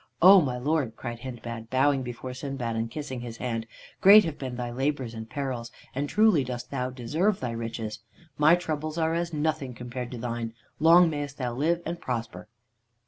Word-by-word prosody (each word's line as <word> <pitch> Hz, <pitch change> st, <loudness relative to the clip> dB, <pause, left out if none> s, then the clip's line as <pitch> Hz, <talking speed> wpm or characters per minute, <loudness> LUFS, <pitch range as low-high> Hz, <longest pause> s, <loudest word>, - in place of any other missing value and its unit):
"O 190 Hz, +2 st, +9 dB
my 130 Hz, -5 st, -1 dB
lord," 135 Hz, -3 st, 0 dB
cried 120 Hz, -1 st, -6 dB
Hindbad, 115 Hz, -2 st, -7 dB
bowing 135 Hz, +2 st, +3 dB
before 125 Hz, +1 st, -6 dB
Sindbad, 130 Hz, -3 st, -4 dB
and 115 Hz, +1 st, -1 dB
kissing 140 Hz, -2 st, -5 dB
his 120 Hz, -1 st, -7 dB
hand, 115 Hz, -2 st, -3 dB, 0.3 s
"great 205 Hz, +1 st, +9 dB
have 160 Hz, -3 st, -4 dB
been 130 Hz, -2 st, -4 dB
thy 120 Hz, -1 st, -4 dB
labors 135 Hz, -1 st, -1 dB
and 110 Hz, 0 st, -7 dB
perils, 125 Hz, -5 st, -4 dB, 0.2 s
and 140 Hz, +2 st, -2 dB
truly 210 Hz, -9 st, +4 dB
dost 125 Hz, -1 st, -6 dB
thou 130 Hz, -2 st, -1 dB
deserve 155 Hz, -, 0 dB
thy 125 Hz, -2 st, -3 dB
riches. 115 Hz, -1 st, -4 dB, 0.4 s
My 150 Hz, +3 st, +6 dB
troubles 155 Hz, -2 st, -3 dB
are 160 Hz, 0 st, +1 dB
as 170 Hz, 0 st, -1 dB
nothing 150 Hz, -4 st, -1 dB
compared 125 Hz, 0 st, -6 dB
to 125 Hz, -, -7 dB
thine. 115 Hz, -1 st, -4 dB, 0.2 s
Long 170 Hz, +3 st, +7 dB
mayest 145 Hz, -3 st, -4 dB
thou 125 Hz, -3 st, -2 dB
live 165 Hz, +7 st, 0 dB
and 170 Hz, +1 st, -4 dB
prosper!" 115 Hz, -7 st, -4 dB
130 Hz, 185 wpm, -27 LUFS, 120-155 Hz, 0.4 s, O